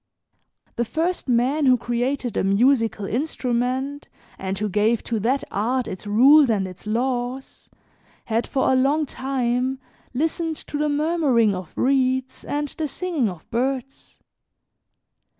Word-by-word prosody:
The 235 - +2
first 325 +9 -2
man 260 +5 +2
who 255 -1 +6
created 245 +1 -2
a - - +1
musical 225 +1 +2
instrument 255 +2 -2 0.3
and 190 0 -3
who 210 +2 -1
gave 210 +3 +1
to 230 -2 -2
that 250 +6 0
art 245 +6 0
its 185 +3 -7
rules 265 +7 +6
and 200 -4 +1
its 185 +3 -12
laws, 245 +3 -3 0.6
had 230 +1 -1
for 265 - +1
a - - +4
long 280 +4 +2
time 260 -1 -1 0.3
listened 320 +4 -1
to 295 -1 -6
the 300 0 +1
murmuring 290 -8 +2
of 185 -3 -6
reeds 260 -1 +1
and 290 0 -2
the 310 +2 -3
singing 305 - -1
of 175 -4 -10
birds. 260 +2 -3
255 Hz, 135 wpm, -23 LUFS, 230-280 Hz, 0.6 s, who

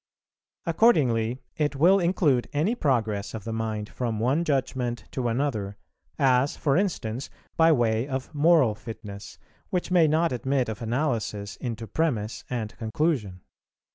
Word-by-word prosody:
Accordingly 130 - +2
it 150 -2 0
will 180 +8 +5
include 160 - +2
any 160 +10 +1
progress 115 - 0
of 110 - -6
the 115 - -4
mind 110 -2 -3
from 115 -3 -3
one 130 +9 +2
judgment 130 -6 -1
to 125 -2 -2
another, 115 -5 -1 0.4
as, 135 -1 +3
for 140 -3 +1
instance, 140 - -1 0.3
by 165 0 +5
way 120 -3 +2
of 130 -2 -4
moral 150 -6 +4
fitness, 105 -3 -9 0.3
which 180 0 -2
may 170 -3 +5
not 160 +3 +2
admit 130 0 0
of 110 +2 -6
analysis 115 -5 -2
into 115 -2 -5
premiss 110 -5 -1
and 115 -2 -4
conclusion. 110 - -1
125 Hz, 140 wpm, -26 LUFS, 110-150 Hz, 0.4 s, will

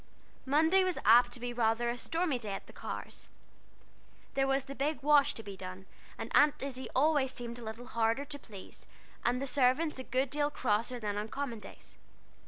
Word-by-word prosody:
Monday 320 +7 +4
was 370 -2 0
apt 240 +3 +7
to 245 - -5
be 245 0 -4
rather 230 0 +1
a - - -3
stormy 320 +2 -1
day 210 -4 -4
at - - -6
the - - -15
Carrs'. - - -7 1.0
There 270 0 +2
was 270 0 +1
the 275 - -7
big 285 +1 -2
wash 295 -1 +5
to 225 - -6
be 200 -2 -8
done, 185 0 -8 0.3
and - - -6
Aunt 290 -2 +4
Izzie 260 -2 -5
always 280 -1 +3
seemed 240 -1 -6
a - - -9
little 225 +2 -7
harder 230 +3 0
to 285 0 -6
please, 205 -7 -12 0.4
and 245 +1 +1
the 275 - -2
servants 275 +3 +2
a - - -4
good 255 +1 -1
deal 290 0 +1
crosser 240 -2 -1
than 205 -2 -3
on 210 - -4
common 250 -2 -4
days. - - -13
255 Hz, 195 wpm, -32 LUFS, 230-285 Hz, 1.0 s, apt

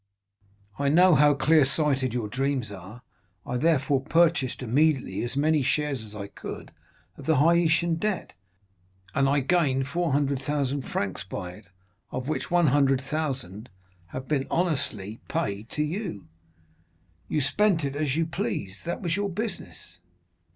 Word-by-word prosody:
I 140 0 +2
know 180 +4 +6
how 145 0 +5
clear 155 +2 +4
sighted 135 -2 +1
your 115 -2 -2
dreams 130 0 -1
are; 100 +5 -10 0.4
I 125 - -2
therefore 140 -2 +2
purchased 155 -4 +2
immediately 135 +3 +1
as 120 +2 -3
many 155 +1 +3
shares 140 -1 0
as 110 -1 -10
I 100 -1 -5
could 100 - -8 0.5
of - - -11
the 160 -3 +4
Haitian 170 +2 +3
debt, 205 +1 -2 0.8
and 135 -1 +2
I 140 0 +3
gained 135 -3 +1
400,000 140 -3 0
francs 100 -6 -3
by 90 -1 -6
it, 100 +4 -14 0.4
of 130 +1 -4
which 155 - -2
100,000 135 - +1 0.4
have 130 +7 -7
been 140 -3 0
honestly 120 - -1
paid 105 +3 -3
to 150 - -1
you. 155 - -4 1.0
You 150 - 0
spent 190 +3 +2
it 140 0 -3
as 145 -2 0
you 165 +1 +1
pleased; 160 - -4
that 170 +3 -3
was 170 -1 0
your 205 0 -1
business. 170 - -6
140 Hz, 140 wpm, -26 LUFS, 125-160 Hz, 1.0 s, know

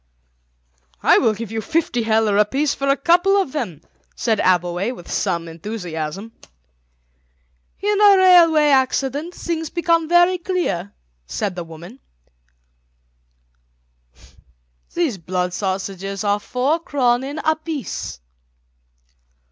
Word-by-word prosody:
"I - - +6
will 220 -2 +2
give 220 0 -7
you 225 0 -3
fifty 320 -4 -1
heller 220 -2 +2
apiece 270 +8 +1
for 275 - -3
a 275 +1 +3
couple 355 +7 +3
of 380 -9 -1
them," 210 - -4 0.3
said 220 -3 0
Abbleway 180 +3 +1
with 175 - -11
some 170 -1 -1
enthusiasm. 175 +1 -6 1.5
"In 415 +1 +1
a 405 -2 +7
railway 335 -5 +6
accident 275 +4 0
things 325 -2 -4
become 335 -2 0
very 350 +1 +4
dear," 340 - -2 0.3
said 195 - -3
the 175 - -5
woman; 170 +9 -12 3.0
"these 315 - -1
blood 180 +1 -2
sausages 195 0 -4
are 205 0 +1
four 260 +9 -1
kronen 270 -1 0
apiece." 315 - -3
245 Hz, 110 wpm, -20 LUFS, 195-325 Hz, 3.0 s, a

